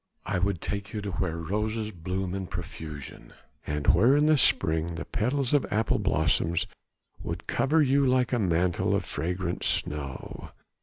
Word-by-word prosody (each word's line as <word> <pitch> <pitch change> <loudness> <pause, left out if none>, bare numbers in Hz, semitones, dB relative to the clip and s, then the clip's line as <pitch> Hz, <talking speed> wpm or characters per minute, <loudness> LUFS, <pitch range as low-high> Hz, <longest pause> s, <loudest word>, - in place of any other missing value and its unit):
I 95 -1 -1
would 95 -1 0
take 100 0 -4
you 105 - -3
to 100 -1 -4
where 85 -2 -2
roses 105 +6 -2
bloom 90 +1 -3
in 95 -1 -3
profusion, 80 -5 -8 0.3
and 75 -1 -2
where 120 - +5
in 150 - +4
the 155 0 +5
spring 85 - +2
the - - -5
petals 130 +4 0
of 145 - +4
apple 110 +1 +1
blossoms 80 +3 +1 0.6
would - - -5
cover 155 +3 +2
you 140 +1 +3
like 125 0 +2
a 120 - +2
mantle 90 -2 +1
of - - -1
fragrant 90 +3 -3
snow. 70 -3 -2
95 Hz, 160 wpm, -27 LUFS, 85-110 Hz, 0.6 s, where